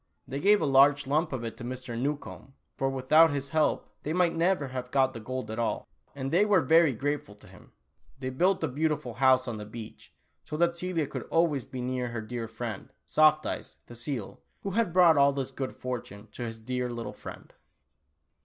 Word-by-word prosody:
They 135 - -4
gave 205 +5 +4
a - - +2
large 140 +1 +5
lump 155 +5 +1
of 130 -3 -3
it 115 - -5
to - - -8
Mr. 125 0 -6
Newcombe, 140 +1 -4 0.2
for 135 - 0
without 145 +5 +5
his 140 -1 -3
help 155 0 +1
they 155 - -3
might 175 -1 +2
never 165 -4 +1
have 125 -1 -5
got 130 0 +2
the 115 - -7
gold 125 -1 -5
at 110 - -4
all, 115 - -1 0.3
and 135 -1 -4
they 180 +5 +4
were 205 -3 +4
very 160 +2 +5
grateful 135 -4 -3
to 105 - -18
him. - - -17 0.5
They 130 -1 -4
built 180 +7 +2
a - - +2
beautiful 150 -2 -1
house 130 +1 +4
on 115 -2 -3
the 105 - -7
beach 110 0 -10 0.3
so 150 - -5
that 170 +1 +2
Celia 170 -3 -1
could - - -6
always 165 -6 +2
be 130 -2 -6
near 125 0 -2
her 115 -1 -4
dear 115 +1 -5
friend, 115 -2 -6
Soft 155 0 +4
Eyes, - - -5
the - - -12
seal, 120 - -5 0.2
who 195 - -3
had 225 -1 +1
brought 170 -3 +6
all 140 0 +5
this 135 -2 -3
good 130 -2 -5
fortune 110 -5 -6
to 120 - -6
his 115 0 -7
dear 125 +2 -3
little 120 -1 -5
friend. - - -11
135 Hz, 210 wpm, -28 LUFS, 125-155 Hz, 0.5 s, brought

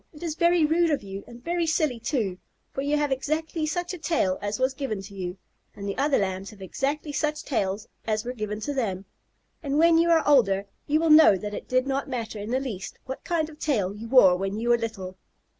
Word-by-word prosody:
It 300 +1 -12
is 330 -3 -2
very 340 0 +3
rude 330 +2 +3
of 290 -7 0
you, 195 0 -7
and 240 0 -13
very 340 0 0
silly 305 -6 +1
too, 220 -7 -2 0.3
for 270 - -3
you 290 +2 +1
have 295 -1 0
exactly 310 +4 -1
such 350 +3 -2
a 360 - -7
tail 300 - 0
as 205 0 -2
was 260 +1 +2
given 260 -7 -3
to 200 +1 -11
you, 185 -1 -5 0.4
and 200 0 -6
the 200 - -2
other 280 +1 +2
Lambs 190 0 -2
have 215 - -14
exactly 280 - -2
such 300 +1 -1
tails 205 -4 -2 0.2
as 215 0 0
were 250 - -3
given 210 -3 -4
to 290 - -2
them, 200 -8 -2 0.6
and 280 -1 -1
when 330 +1 +5
you 340 +1 +3
are 330 -1 +4
older 200 -9 +4 0.2
you 305 +2 +3
will 325 -1 +2
know 305 -10 +8
that 210 +3 -6
it - - -6
did 255 0 +2
not 275 0 -2
matter 230 -4 -4
in 205 +2 -6
the 255 +2 +1
least 210 -9 -6
what 265 0 -6
kind 330 -3 0
of 305 -1 -14
tail 205 -11 0
you 215 +3 -8
wore 225 -8 +7
when 195 +3 -3
you 235 +1 -1
were 240 - +5
little." 190 -5 -5
255 Hz, 235 wpm, -26 LUFS, 205-305 Hz, 0.6 s, know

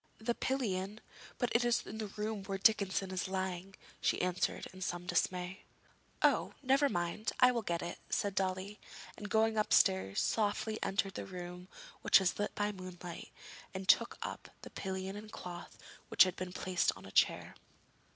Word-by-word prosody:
'The 230 +2 -1
pillion? 210 -6 -1 0.4
But 245 - 0
it 235 - +4
is 240 -1 +2
in 220 - -7
the 215 - -2
room 210 0 -4
where 195 0 -2
Dickinson 195 -2 +3
is 185 0 -1
lying,' 190 0 -3 0.3
she - - +2
answered 180 0 0
in 185 - -11
some 175 -2 -3
dismay. 180 +1 -1 0.6
'Oh, - - +3
never 275 +2 +4
mind, 175 +4 -1
I 250 0 +7
will 235 -2 -1
get 170 -5 -2
it!' 175 - -5
said 200 -1 0
Dolly, 190 +2 -2 0.4
and, 210 - -7
going 220 0 +3
upstairs, 95 - +3
softly 215 0 0
entered 195 0 0
the - - -5
room, 180 -1 -7 0.3
which - - +7
was 190 0 0
lit 205 - -1
by 210 0 0
moonlight, 185 -3 -8 0.5
and 190 0 -4
took - - +4
up - - -6
the - - -9
pillion 190 0 -4
and 210 +1 -9
cloth, 175 -1 -8 0.3
which - - +8
had 185 -1 -1
been 185 0 -5
placed 180 -1 +1
on 95 +1 -12
a 95 - -10
chair. - - +2
190 Hz, 170 wpm, -34 LUFS, 180-215 Hz, 0.6 s, which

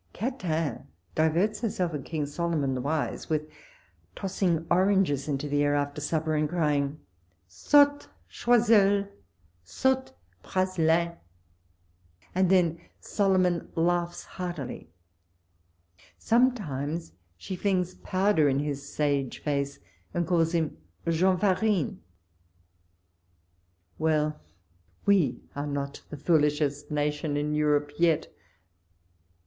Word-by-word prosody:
Catin 180 - -2 0.3
diverts 175 +7 +1
herself 185 -7 -1
and 145 -3 -4
King 155 -1 -3
Solomon 150 -2 -1
the 130 - -2
wise 150 +3 -2
with 155 -1 0 0.7
tossing 185 -4 -1
oranges 185 -6 +3
into 145 0 -2
the 145 0 +1
air 145 0 +2
after 145 +1 -2
supper, 155 +1 -1
and 150 -1 +1
crying, 150 -3 0 0.5
''Saute, 285 - +3 0.2
Choiscul! 210 -4 +3 0.6
saute, 260 - 0 0.3
Praslin!" 170 - +1 1.2
and 185 0 +2
then 170 -3 +3 0.2
Solo 195 -2 +1
mon 180 -2 +1
laughs 175 +1 0
heartily. 170 - -6 1.3
Sometimes 170 - 0 0.3
she 185 - -6
tlings 185 -1 -1
pow 195 +2 +1
der 155 -7 +4
in 135 - +1
his 145 -1 -2
sage 140 -3 0
face, 140 -1 -2 0.4
and 175 0 +1
calls 165 0 +2
him 160 - -1 0.3
Jean 180 +3 +3
Farinc! 200 +2 +1 2.0
Well! 155 -1 +1 0.7
we 175 -12 +3
are 145 +1 -3
not 140 -1 -4
the 150 - -7
foolishest 150 -1 +1
nation 150 0 -1
in 150 +1 -1
Europe 150 -1 +1
yet 165 -2 +2
160 Hz, 105 wpm, -27 LUFS, 145-185 Hz, 2.0 s, der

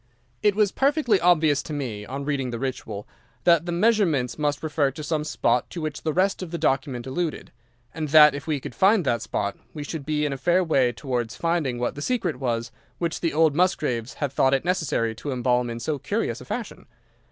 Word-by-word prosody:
"It 205 -2 +3
was 210 -2 +3
perfectly 275 -7 +2
obvious 155 -5 +4
to 155 - -7
me, 115 -8 -4
on 140 +2 -5
reading 140 -3 -1
the 120 - -4
Ritual, 115 -5 -5 0.4
that 170 -1 +4
the - - -1
measurements 170 - +2
must 145 -1 -1
refer 150 -2 +1
to 150 +3 -8
some 150 0 -1
spot 125 -5 0
to 175 - -6
which 155 -2 -4
the 155 - -1
rest 190 +5 +1
of 185 - -5
the 170 - -4
document 135 -5 0
alluded, 155 +4 -3 0.4
and 155 -2 -3
that 150 0 +8
if 145 +2 -7
we 150 -3 0
could 125 - -8
find 190 - +4
that 120 -4 +1
spot, 100 -2 -2 0.2
we 150 - -4
should 150 0 -5
be 150 +1 0
in 145 - -1
a - - -4
fair 175 +4 +3
way 135 -7 +2
towards 120 -3 -3
finding 165 -7 0
what 120 0 -1
the 145 - -8
secret 195 - -1
was 115 -3 -2 0.3
which 170 -1 -2
the 165 - +1
old 160 -1 +3
Musgraves 145 -9 0
had 145 -3 -2
thought 135 0 +3
it 135 - -2
necessary 160 -11 0
to 140 +6 -6
embalm 125 -1 +1
in 115 0 -5
so 145 +4 -2
curious - - -2
a - - -10
fashion. - - -6
150 Hz, 215 wpm, -24 LUFS, 125-170 Hz, 0.4 s, that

